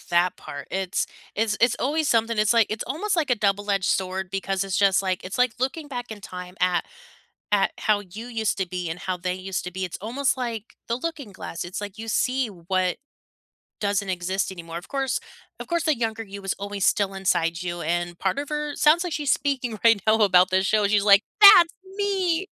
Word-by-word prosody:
That 175 +1 +2
part, 145 -3 -9
it's 190 -1 -1 0.3
it's 215 -1 0
it's 235 +1 +4
always 300 +3 0
something. 230 -1 +2
It's 215 +1 +4
like 230 -2 +4
it's 215 +1 -3
almost 365 - -1
like 310 -5 0
a - - +5
double-edged 200 -2 0
sword 190 0 -1
because 195 0 -1
it's 195 -1 -2
just 195 -1 +4
like 185 -1 -2
it's 185 +6 -5
like 250 -2 +3
looking 280 +4 -2
back 245 -3 -6
in 215 -2 -7
time 180 -1 -8
at 180 -2 +2 0.7
at 200 -2 +3
how 210 -1 +2
you 205 +4 -9
used 225 -3 -1
to 190 -2 -1
be 180 -1 -4
and 165 +2 -4
how 185 -1 -2
they 180 +1 -2
used 185 0 -4
to 180 - -6
be. 190 +1 -3
It's 180 - -6
almost 255 +6 0
like 235 -3 -5
the 230 - 0
looking 280 -5 -5
glass, 175 -2 -6
it's 180 +3 -5
like 205 0 -7
you 225 0 -7
see 255 +2 +1
what 185 -1 -1 0.8
doesn't 200 -1 0
exist 185 +2 -2
anymore. 170 -2 -7
Of 175 - -13
course 270 -2 -1 0.4
of - - -7
course, 340 -2 -1
the 310 -3 +2
younger 225 -1 -2
you 200 -2 -9
was 195 - -1
always 200 0 -3
still 200 -1 +2
inside 170 -3 0
you, 175 -1 -4
and 175 +1 -2
part 190 +7 -1
of 285 0 -3
her 300 -1 -3
sounds 320 +4 +4
like 355 - -3
she's 295 -3 0
speaking 255 -6 -1
right 225 -3 +6
now 215 0 +5
about 185 -2 +5
this 190 +1 +2
show, 210 0 +3
she's 205 0 +2
like, 200 0 +7 0.2
"That's 400 -5 +9 0.2
me!" 385 -3 0
205 Hz, 215 wpm, -24 LUFS, 185-250 Hz, 0.8 s, That's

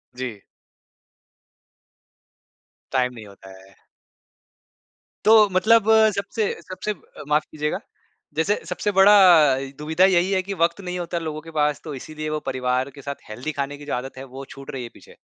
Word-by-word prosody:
जी। 120 -6 -6 2.5
Time 125 -1 +1
नहीं 110 -3 -10
होता 100 -1 -15
है। 95 0 -19 1.5
तो 215 -2 +7
मतलब 220 +4 +4 0.3
सबसे 200 +2 -2 0.2
सबसे 185 +3 -5
ब 170 - -22 0.3
माफ़ 150 +1 +2
कीजिएगा। 150 0 -2 0.6
जैसे 180 +6 +2
सबसे 205 - -2
बड़ा 195 +1 +6 0.7
दुविधा 160 +5 +2
यही 185 0 +3
है 190 -1 +2
की 200 +1 -5
वक़्त 170 +4 0
नहीं 180 -1 -4
होता 170 0 -3
लोगों 155 -1 -5
के 165 +1 -12
पास 150 -1 0
तो 155 -3 -6
इसीलिए 155 +3 -6
वो 155 - -2
परिवार 130 0 -1
के 140 - -11
साथ 140 -4 -8
हेल्दी 125 +8 -5
खाने 145 0 -4
की 145 - -12
जो - - -4
आदत 130 +2 -5
है, 135 - -7
वो 135 +1 -9
छूट 135 0 -10
रही 130 -2 -5
है 120 - -7
पीछे। - - -17
155 Hz, 165 wpm, -23 LUFS, 130-185 Hz, 2.5 s, तो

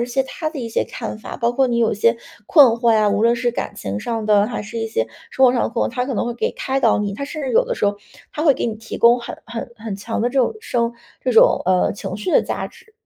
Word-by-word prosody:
一 - - +1
些 250 +2 0
它 310 +4 -4
的 315 - -7
一 235 -3 -4
些 225 - 0
看 225 - -6
法， 215 - -8
包 235 0 0
括 265 +1 +2
你 235 -1 0
有 230 -1 +2
一 - - -1
些 230 +3 +2 0.3
困 290 -5 +8
惑 235 0 +2
呀， 215 -1 +3
无 205 +1 +1
论 235 +1 +4
是 240 0 0
感 - - -4
情 100 +1 -4
上 225 - -3
的 210 0 +4
还 - - -4
是 215 +3 -8
一 225 0 -2
些 110 - -1 0.2
生 265 - +4
活 245 - +4
上 245 - +1
的 - - 0
困 235 0 -1
惑， - - -10
它 250 0 -1
可 265 - -3
能 235 - -1
会 240 - -3
给 235 - -1
开 270 0 -2
导 - - +3
你。 205 -1 -2
它 280 - -4
甚 305 +2 -6
至 270 -3 -3
有 - - +4
的 - - -3
时 - - -1
候， 205 0 +1 0.4
它 300 - -3
会 305 -3 +6
给 - - -2
你 225 - -2
提 225 +1 -8
供 240 +1 +5
很 235 - -7
很 235 +1 -6
很 220 -2 -6
强 200 +4 -4
的 235 - +1
这 270 +2 +1
种 250 - +1
生 235 - -1 0.3
这 255 - -1
种 225 - +5
呃， 185 -1 +2
情 195 -1 -6
绪 210 +10 -3
的 - - +6
价 - - -3
值。 440 - -18
235 Hz, 325 characters per minute, -20 LUFS, 215-255 Hz, 0.4 s, 困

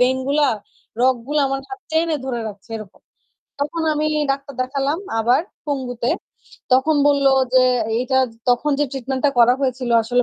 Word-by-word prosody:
Vein 255 +1 +3
গুলা, 290 +1 +3 0.5
রগগুলা 260 +3 +1
আমার 270 0 -2
হাত 395 0 -8
টেনে 320 0 +1
ধরে 250 -3 -3
রাখছে 205 0 -12
এরকম। 215 -3 -11 0.6
তখন 300 +3 -2
আমি 305 +1 0 0.2
ডাক্তার 275 +1 -3
দেখালাম 275 +4 -1 0.2
আবার, 240 +3 +3 0.3
পঙ্গুতে। 250 -4 -2 0.6
তখন 280 +4 +4
বলল 280 -1 +2 0.3
যে 255 - +7 0.4
"এইটা 255 +2 0
জ - - -19 0.2
তখন 245 +5 +1
যে - - +4
ট্রিটমেন্ট 265 0 -3
টা - - +3
করা 240 +1 +6
হয়েছিল 255 -2 -1
আসলে 245 +2 +1
265 Hz, 160 wpm, -20 LUFS, 245-285 Hz, 0.6 s, যে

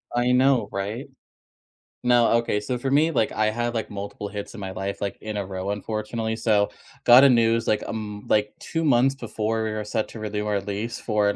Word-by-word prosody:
I 120 +1 +2
know, 125 -3 +3
right? 105 +7 -4 1.0
No, 120 -1 +5
okay, 115 -3 0
so, 125 +4 -2
for 135 +2 -2
me, 155 +4 +4
like, 110 - +1
I 110 0 +1
had, 120 +2 -1
like, 115 -2 -3
multiple 100 0 -6
hits 100 0 -6
in 115 - -9
my 95 -1 -4
life, 95 +1 -4
like, 100 -1 -3
in 110 0 -5
a 100 -1 -2
row, 95 +1 -4
unfortunately 110 +2 -3
so, 105 -3 +2 0.3
got 125 +3 +8
a - - +7
news 115 -2 +3
like 105 - +2
a - - -7
m 105 -2 -5
like 105 0 +2
2 165 0 -2
months 135 -1 +4
before 110 -3 -2
we 110 - -2
were 110 0 -3
set 110 +1 -2
to 115 - -9
renew 105 -1 -3
our 105 -1 0
lease 105 +4 -4
for 105 -2 +1
an 100 - -1
110 Hz, 220 wpm, -24 LUFS, 105-120 Hz, 1.0 s, got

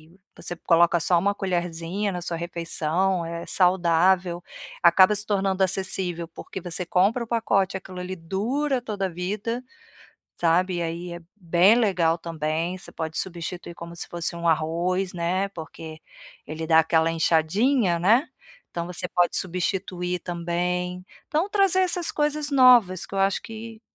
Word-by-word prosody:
e 195 - -27 0.2
você 175 - -6
coloca 170 0 +3
só 170 +2 +3
uma 200 +2 0
colherzinha 175 +2 -2
na 180 -1 -4
sua 170 -1 -3
refeição, 170 +1 -1
é 170 0 -5
saudável. 180 0 +2 0.4
Acaba 185 +3 +6
se 205 +1 -1
tornando 195 -2 +1
acessível, 185 -2 -1
porque 175 +3 -9
você 175 0 -3
compra 200 +8 +2
o - - -9
pacote, 200 -5 +1
aquilo 185 -1 -10
ali 180 +1 -5
dura 240 - -1
toda 200 -5 -3
vida, 205 +7 -3 0.8
sabe? 175 +2 +2
E 175 - -2
aí 170 +1 -4
é 170 - -8
bem 180 +2 +4
legal 180 -8 +2
também, 165 +2 -3
você - - -11
pode 160 -1 -5
substituir 175 -1 -5
como 170 0 -9
se - - -5
fosse 170 0 -3
um 170 0 -2
arroz, 170 +4 0
né, 180 +3 -1
porque 160 -2 -9 0.5
ele 160 +1 -5
dá 160 -1 +6
aquela 160 0 +2
enxadinha, 170 - +2
né, 230 - +3 0.4
então 170 -1 -4
você 180 - -5
pode 175 -1 +2
substituir 180 0 -2
também. 180 +1 -3 0.2
Então, 320 +6 +1
trazer 390 -2 +3
essas 360 -2 +2
coisas 295 0 0
novas 245 -9 +5
que - - -9
eu 195 - 0
acho 195 0 +2
que 225 0 -9
180 Hz, 155 wpm, -24 LUFS, 170-195 Hz, 0.8 s, Acaba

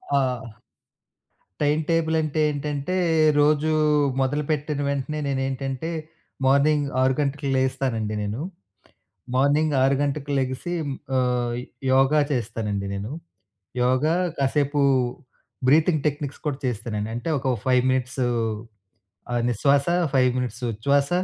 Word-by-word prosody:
ఆ! 125 -4 -1 1.0
Time 150 +1 +2
table 165 -1 +2
అంటే 155 0 -2
ఏంటంటే 145 +3 -3 0.5
రోజు 150 +1 +3 0.5
మొదలుపెట్టిన 145 +1 -1
వెంటనే 140 +2 -2
నేనేంటంటే 135 +2 -2 0.6
మార్నింగ్ 145 +2 +3
6 130 0 +3
గంటలకు 140 0 -1
లేస్తానండి 125 -5 -1
నేను. 105 +4 -3 1.0
మార్నింగ్ 145 +4 +3
6 135 +1 +3
గంటలకు 145 0 -2
లెగిసి 130 +7 -2 0.4
ఆహ్, 125 -2 +1 0.4
యోగా 135 +3 +4
చేస్తానండి 110 -5 -2
నేను. 100 +6 -5 0.7
యోగా 130 +6 +2 0.2
కాసేపు 145 +1 +1 0.9
బ్రీతింగ్ 155 +2 +4
టెక్నిక్స్ 145 -1 -3
కూడా 145 -2 -1
చేస్తానండి 110 -2 -3
అంటే 120 +7 -4
ఒక 130 -1 0
5 125 -1 +4
మినిట్సు 130 0 0 1.1
ఆహ్, 120 -1 +1
నిశ్వాస 140 +4 +2 0.3
5 130 -1 +4
మినిట్స్ 125 0 -4
ఉచ్ఛ్వాస, 140 +6 +1
135 Hz, 105 wpm, -24 LUFS, 125-145 Hz, 1.1 s, యోగా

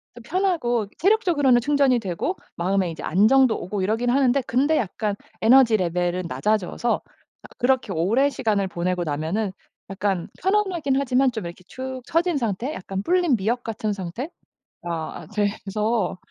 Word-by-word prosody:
좀 240 - -12
편하고 300 - 0
체력적으로는 340 - +3
충전이 275 -1 +3
되고 195 - -2 0.2
마음에 185 0 0
이제 160 - -8
안정도 220 +7 +4
오고 190 +3 -3
이러긴 225 +5 0
하는데 265 +1 +3
근데 280 +6 +2
약간 210 0 -2 0.2
에너지 235 -1 +6
레벨은 180 0 -1
낮아져서 215 +4 0 0.5
아 - - -11
그렇게 250 -5 +1
오랜 215 - +2
시간을 210 -7 0
보내고 180 0 -2
나면은 165 +7 -2 0.4
약간 195 -2 -1
편안하긴 375 -8 +1
하지만 265 -1 +2
좀 220 -6 -5
이렇게 170 +2 -9
축 260 +2 -6
처진 335 0 +1
상태? 235 +3 -2
약간 195 -3 -5
불린 350 - +2
미역 230 +5 -1
같은 215 -1 -2 0.7
상태?가 165 -2 -6
돼서 210 0 -1
225 Hz, 335 characters per minute, -23 LUFS, 190-270 Hz, 0.7 s, 에너지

